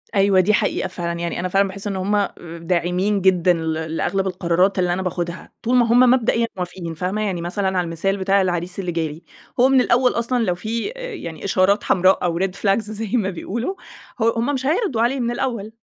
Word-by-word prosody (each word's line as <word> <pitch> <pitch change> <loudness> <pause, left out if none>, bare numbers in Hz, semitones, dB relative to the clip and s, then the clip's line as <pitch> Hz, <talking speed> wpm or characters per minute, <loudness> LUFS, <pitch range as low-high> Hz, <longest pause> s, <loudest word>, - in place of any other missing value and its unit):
أيوه 195 -1 +4
دي 185 +3 +3
حقيقة 190 - 0
فعلًا، 170 -2 -4
يعني 170 0 -3
أنا 180 - -1
فعلًا 195 +2 +2
باحس 195 +2 -7
إن 200 - -2
هُم 200 +2 +1 0.4
داعمين 180 +4 0
جدًا 180 -1 +4
ل 160 -1 -2
لأغلب 160 +5 -2
القرارات 180 +1 +1
اللي 180 -1 +2
أنا 185 - -2
باخدها، 175 -1 -4
طول 245 +2 +1
ما 245 -1 +5
هُم 235 +2 +4
مبدئيًا 245 -2 +3
موافقين 175 -2 -5
فاهمة؟ 185 +6 -2
يعني 190 -5 -2
مثلًا 190 +3 -2
على - - +3
المثال 170 +4 -1
بتاع 195 +1 +2
العريس 180 0 -2
اللي 180 -2 -2
جالي، 160 -1 -3 0.4
هو 255 +2 +6
من 265 -1 +5
الأول 250 +1 +3
أصلًا 235 +1 0
لو 180 -5 0
في 225 - -3
آآ - - -6
يعني 165 - -7
إشارات 195 +1 +2
حمراء 185 +1 +3
أو 170 -1 0
Red 190 0 0
flags 195 +2 +4
زي 215 -1 -5
ما 200 -4 0
بيقولوا 230 - -4 0.4
ه - - 0
هُم 240 +5 0
مش 265 -1 -3
هيرضوا 310 - +1
عليه 250 +3 +1
من 240 -1 -1
الأول 240 -4 -3
195 Hz, 210 wpm, -21 LUFS, 180-230 Hz, 0.4 s, هو